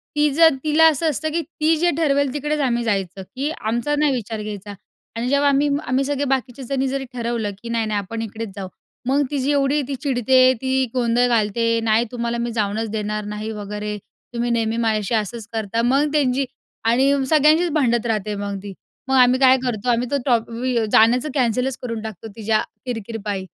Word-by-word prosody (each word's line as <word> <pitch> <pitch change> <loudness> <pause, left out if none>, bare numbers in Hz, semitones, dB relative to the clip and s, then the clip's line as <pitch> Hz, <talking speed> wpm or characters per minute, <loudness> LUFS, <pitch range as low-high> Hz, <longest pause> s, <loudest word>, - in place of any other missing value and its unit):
ती 295 0 +3
जर 325 +1 +7
तिला 310 +1 +4
असं 315 +1 0
असतं 310 +2 -2
की 335 +2 0
ती 320 0 0
जे 350 +3 +2
ठरवेल 285 -4 +1
तिकडेच 295 +1 -2
आम्ही 240 -4 +1
जायचं, 195 -3 -2
की 280 +3 -1
आमचा 235 +7 -1
नाही 300 -1 +3
विचार 225 -3 -4
घ्यायचा. 205 -1 -7 0.4
आणि 230 +2 -2
जेव्हा 280 +1 +3
आम्ही 280 +1 +2 0.2
आम्ही 260 +2 +1
सगळे 285 0 -1
बाकीचे 265 -1 -2
जणी 270 +1 -1
जरी 270 0 -3
ठरवलं 235 -3 -2
की 235 - -8
नाही-नाही 220 -3 -1
आपण 225 +4 -5
इकडेच 225 0 -5
जाऊ, 195 -2 -5 0.4
मग 275 +2 +3
तिची 280 -1 0
एवढी 285 +1 +2
ती 280 - -3
चिडते, 255 -1 +4
ती 265 0 +1
गोंधळ 245 -1 +2
घालते, 230 0 +1
"नाही 225 +1 +3
तुम्हाला 235 -1 -2
मी 235 0 -2
जाऊनच 220 0 -1
देणार 210 -1 -3
नाही" 210 +1 -5
वगैरे 210 0 -5 0.4
"तुम्ही 240 0 -1
नेहमी 230 -1 0
माझ्याशी 220 -1 0
असंच 225 +1 -7
करता." 225 0 -1
मग 275 +5 +2
त्यांची 275 -2 +2 0.4
आणि 260 +5 +4 0.2
सगळ्यांशीच 310 +3 +4
भांडणं 245 -6 +3
राहते 210 -2 -1
मग 200 0 -4
ती. 200 -1 -7 0.3
मग 265 - +1
आम्ही 255 0 +5
काय 260 -1 +6
करतो, 245 -2 -2
आम्ही 240 +1 +1
तो 285 - +2
टॉप 235 -4 +1
वि 245 +2 -2
अ, 225 - +2
जाण्याचं 240 +6 +4
कॅन्सलच 250 0 0
करून 230 -3 -4
टाकतो 220 -1 -7
तिच्या 220 -1 +1 0.2
किर-किरपायी. 215 -4 -4
240 Hz, 190 wpm, -21 LUFS, 220-275 Hz, 0.4 s, जर